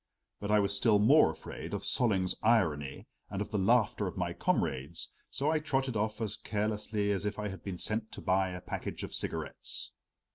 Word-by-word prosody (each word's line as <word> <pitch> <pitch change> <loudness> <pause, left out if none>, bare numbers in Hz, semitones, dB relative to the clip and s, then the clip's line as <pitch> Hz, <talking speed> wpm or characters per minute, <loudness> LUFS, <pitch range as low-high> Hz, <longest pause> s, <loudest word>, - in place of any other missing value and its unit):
But 100 - -4
I 105 0 +5
was 100 0 +1
still 105 +1 +4
more 130 - +6
afraid 80 - -6
of - - -4
Solling's 95 -7 +3
irony 80 - +1 0.2
and 100 - -4
of 105 - -3
the 105 - 0
laughter 105 0 +3
of 90 - -6
my 90 -2 -1
comrades, 75 +2 -1 0.2
so 145 +3 0
I 160 - +2
trotted 135 -4 -1
off 110 +1 -1
as 110 -1 +1
carelessly 105 -1 -1
as 100 -1 -1
if 105 0 -2
I 105 -1 -2
had 95 - -8
been 95 -3 -4
sent 110 +4 -1
to - - -7
buy 95 0 +2
a 90 -1 -6
package - - -5
of - - -6
cigarettes. - - -3
105 Hz, 195 wpm, -31 LUFS, 95-110 Hz, 0.2 s, more